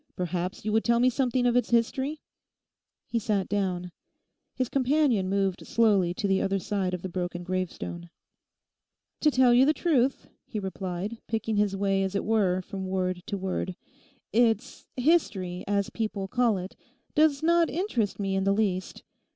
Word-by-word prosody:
Perhaps 180 +2 -3
you 215 - 0
would 220 - +3
tell 235 0 +3
me 255 +1 +4
something 250 0 +1
of 245 -1 +3
its 245 -2 +2
history?' 265 +6 0 0.8
He 235 - -1
sat 205 -3 0
down. 180 -3 -2 0.6
His 255 - 0
companion 260 -7 +2
moved 195 -1 -1
slowly 205 -6 +3
to 200 - -1
the 195 0 +2
other 195 0 +1
side 190 -1 -1
of 175 - -9
the - - -2
broken 175 -1 -4
gravestone. 175 -1 -4 1.1
'To 305 - +4
tell 255 -3 +4
you 245 +2 +6
the 305 +3 +3
truth,' 275 -6 +1 0.2
he 220 - -5
replied, 190 +2 -4
picking 220 -1 -1
his 205 -1 +1
way 195 -1 +1
as 190 +1 -2
it 200 - -1
were 195 -4 +2
from 190 0 -6
word 185 -1 -1
to 205 -3 -2
word, 185 -1 -3 0.6
'it's 230 +2 +1
"history," 205 - +1
as 200 -1 0
people 215 -3 -3
call 235 -1 +2
it, 185 +1 -7 0.4
does 305 -1 +3
not 340 0 +4
interest 230 - -1
me 195 -1 -1
in 190 - +1
the 195 0 +3
least. 190 -4 -1
205 Hz, 165 wpm, -27 LUFS, 185-245 Hz, 1.1 s, you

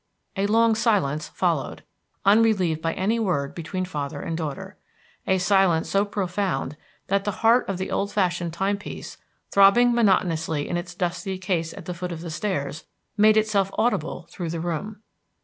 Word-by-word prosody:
A 195 0 0
long 225 +1 +4
silence 195 - +1
followed, - - -2 0.4
unrelieved 200 -6 +3
by 165 0 -1
any 215 +5 0
word 145 -10 -1
between 185 +2 -4
father 145 -6 -4
and 165 - -4
daughter, 155 -4 -5 0.5
a 190 - +3
silence 185 -3 +2
so 200 +1 +3
profound 185 -8 -2 0.3
that 200 +1 0
the 205 - -1 0.2
heart 235 0 +4
of 195 - -1
the 185 - -4
old 200 +1 -1
fashioned 175 -3 0
time 195 +4 -1
piece, 205 - -8 0.3
throbbing 200 +5 +6
monotonously 165 -9 +1
in - - -2
its 175 0 -4
dusky 180 +2 -2
case 180 -3 -2
at - - -10
the 180 - -4
foot 180 +1 -5
of 165 -1 -6
the 170 -1 -6
stairs, 155 -4 -3 0.3
made 215 +1 +5
itself 210 -3 +2
audible 180 -7 0
through 175 -3 -5
the 165 0 -3
room. 185 +6 -4
185 Hz, 165 wpm, -24 LUFS, 165-205 Hz, 0.5 s, throbbing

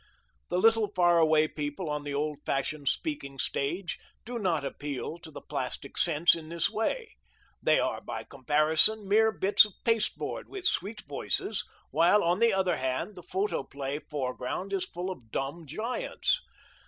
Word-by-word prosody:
The 175 - 0
little 225 +1 +4
far 175 -1 +5
away 155 -1 +4
people 150 +4 -4
on 150 -1 -2
the 145 -1 -4
old 150 0 -2
fashioned 140 +1 -2
speaking 140 - -2
stage 170 +8 -2 0.3
do 240 +1 -4
not 170 -8 0
appeal 145 +3 -5
to 165 -1 -11
the 145 - -10
plastic 140 0 -4
sense 165 0 +4
in 160 -2 -5
this 170 +3 0
way. 440 - -2 0.5
They - - +4
are, - - -1
by - - -5
comparison, 155 - +3
mere 220 +2 +4
bits 200 -1 +6
of 210 -2 -4
pasteboard 225 -2 0
with 390 -2 -6
sweet 215 - 0
voices, 140 - -2 0.3
while, 170 +8 +4
on 175 +3 +2
the 230 0 +5
other 190 -2 +1
hand, 130 +10 -2
the 180 - -10
photoplay 145 -7 -3
foreground 145 +7 -4
is 195 - 0
full 180 +2 -4
of 120 -11 -10
dumb 145 +7 -4
giants. 235 - -1
170 Hz, 160 wpm, -29 LUFS, 145-205 Hz, 0.5 s, bits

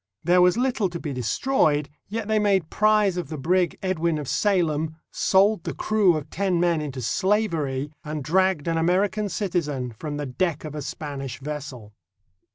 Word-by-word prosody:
There 180 +2 +4
was 180 +4 +4
little 245 -6 +1
to 170 -1 -6
be 150 -4 -4
destroyed, 145 - +1 0.2
yet 220 0 -4
they 220 -1 +2
made 195 -6 +1
prize 210 -3 +3
of 170 -5 -4
the 155 - -5
brig 175 +5 +1
Edwin 170 -4 0
of 150 -3 -5
Salem, 160 - +1 0.2
sold 195 0 +3
the - - -4
crew 205 -5 +3
of 150 -1 -7
ten 190 -2 0
men 170 -2 +2
into 135 -4 -5
slavery, 160 - 0
and 150 -2 -4
dragged 185 0 +1
an 165 -1 +1
American 190 +5 +1
citizen 155 - -2
from 145 +6 -5
the 145 - -3
deck 160 +4 -1
of 150 - -6
a 150 - -4
Spanish 135 -4 -6
vessel. 140 -7 -7
170 Hz, 170 wpm, -24 LUFS, 145-190 Hz, 0.2 s, There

